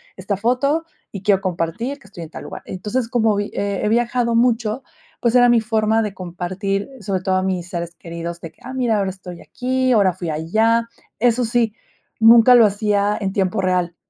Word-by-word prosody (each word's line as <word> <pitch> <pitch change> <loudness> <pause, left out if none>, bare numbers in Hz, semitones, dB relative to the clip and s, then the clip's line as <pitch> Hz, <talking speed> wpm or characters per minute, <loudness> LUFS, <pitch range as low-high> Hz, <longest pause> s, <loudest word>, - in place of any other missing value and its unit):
esta 200 -2 -3
foto 265 +9 +1 0.3
y 200 - -7
quiero 195 -2 +3
compartir 190 - -3
que 210 - -18
estoy 180 -4 -9
en 160 - -9
tal - - -9
lugar, - - -8
entonces, 215 +6 -3
como 225 -3 +2
vi 205 0 -2
he 200 -1 -2
he - - +2
viajado 235 +1 +1
mucho, 230 0 +1 0.4
pues, 235 0 +1
era 245 -1 +6
mi 235 -2 +4
forma 220 0 +1
de 210 -3 -3
compartir, 185 +3 -3
sobre 190 -2 -2
todo 185 0 0
a 185 - +1
mis 180 -2 -2
seres 170 -1 -5
queridos, 170 0 -7
de 165 - -8
que, - - -33
ah, 260 - -7
mira, 245 -4 +1
ahora 195 -2 0
estoy 180 -2 -10
aquí, 255 0 -1
ahora 200 -6 +4
fui 175 -1 -5
allá, 220 +9 +1 0.3
eso 245 +1 +2
sí, 230 -2 0 0.4
nunca 230 +2 +7
lo 235 - +7
hacía 205 0 0
en 195 -3 -2
tiempo 195 0 0
real. 180 -2 0
210 Hz, 200 wpm, -20 LUFS, 185-235 Hz, 0.4 s, nunca